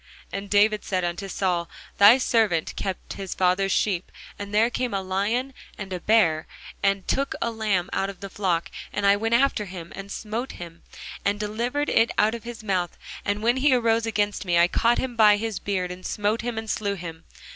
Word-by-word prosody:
And 200 0 -5
David 210 +1 +3
said 185 -2 -1
unto 175 +3 -3
Saul, 180 -3 -1 0.3
Thy 205 +5 +9
servant 220 -10 +1
kept 190 -2 -4
his 195 -2 -6
father's 190 +1 +2
sheep, 185 -4 0 0.3
and 200 0 -6
there 220 +3 +3
came 245 -3 -2
a 195 - 0
lion, 210 +8 -1 0.2
and 195 -2 -6
a 180 - -3
bear, 170 -6 +3 0.3
and 195 -1 +1
took 275 +1 0
a 235 - -1
lamb 210 -5 0
out 195 - 0
of 195 -2 -9
the 195 - -7
flock: 180 -5 -1 0.2
And 205 - -2
I 200 0 +6
went 225 +3 +1
out 235 - +5
after 275 -6 +1
him, 180 -3 -9
and 195 0 -8
smote 225 +4 -4
him, 170 -1 -10 0.4
and 205 +1 0
delivered 235 +8 -2
it 225 +1 +4
out 215 +1 +3
of 235 -1 -7
his 235 -2 -8
mouth: 185 -4 -1 0.3
and 205 +1 -2
when 240 +3 +3
he 265 0 +4
arose 230 -1 +2
against 205 -2 0
me, 175 -3 +1
I 170 0 +6
caught 235 +5 +2
him 260 -2 -3
by 210 -2 +6
his 220 -2 -3
beard, 185 -3 -2
and 180 +1 -9
smote 210 +3 -1
him, 235 0 -4
and 220 0 -4
slew 200 -2 -1
him. 165 -3 -8
205 Hz, 210 wpm, -25 LUFS, 185-225 Hz, 0.4 s, Thy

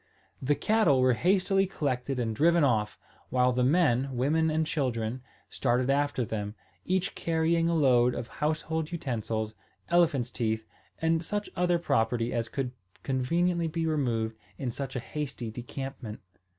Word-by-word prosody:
The 145 +3 +2
cattle 170 -3 +3
were 130 0 +4
hastily 195 - +2
collected 135 -6 -2
and 115 -3 -1
driven 170 +5 +4
off, 110 -6 +1 0.3
while 125 0 +3
the 125 0 +1
men, 135 -3 +3
women, 160 +6 +2
and 160 +1 +1
children 125 -5 -1 0.3
started 125 +1 +1
after 145 -3 +1
them, 105 -1 -4 0.3
each 190 +1 0
carrying 165 0 +1
a 170 - +1
load 125 -5 +4
of 115 - -4
household 155 +2 -2
utensils, 110 -8 -2 0.4
elephants' 150 -8 +3
teeth, 110 -2 -1 0.3
and 165 0 +2
such 205 +4 -3
other 175 0 +2
property 115 -6 0
as 115 -1 -1
could 135 -3 -2
be - - -29 0.3
conveniently 165 +6 +1 0.2
removed 120 -8 0 0.2
in 130 -3 -2
such 135 +2 -5
a - - 0
hasty 130 -4 -5
decampment. 125 -1 -6
135 Hz, 145 wpm, -29 LUFS, 120-160 Hz, 0.4 s, were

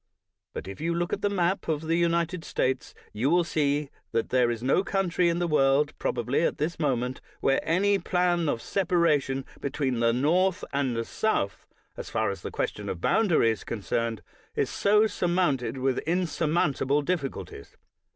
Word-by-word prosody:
But - - -6
if 100 +8 -8
you 170 +1 0
look 175 +1 -1
at - - -3
a 205 - +3
map 185 -1 0
of 155 -2 0
the 165 +1 0
United 170 0 +1
States, 130 -3 -2 0.2
you 120 +6 0
will 175 +2 +4
see 145 -3 0 0.2
that 115 - 0
there 125 -2 +3
is 120 0 -3
no 140 +9 +3
country 180 -3 +1
in 170 - 0
the 175 - 0
world, 145 -2 +3
probably, 125 +2 0
at - - 0
this 160 +3 -2
moment, 125 -4 -1 0.2
where 135 - +2
any 195 +4 +2
plan 175 -2 +1
of 115 - -2
separation 160 -8 +1
be 140 - -2
tween 130 -4 -1
the 115 0 +3
North 175 +10 +2
and 135 -3 0
the 115 0 -2
South, 105 - -1 0.3
as - - -7
far - - 0
as - - -7
the - - -5
question - - -3
of 90 - -4
boundary 165 - +3
is 110 - -5
concerned, 115 +1 -2 0.3
is - - 0
so 210 +2 +4
sur 190 -4 -1
mounted 140 -9 +1
with 130 0 0
insurmountable 155 -4 0
difficulties. 140 - -4
150 Hz, 180 wpm, -27 LUFS, 130-175 Hz, 0.3 s, will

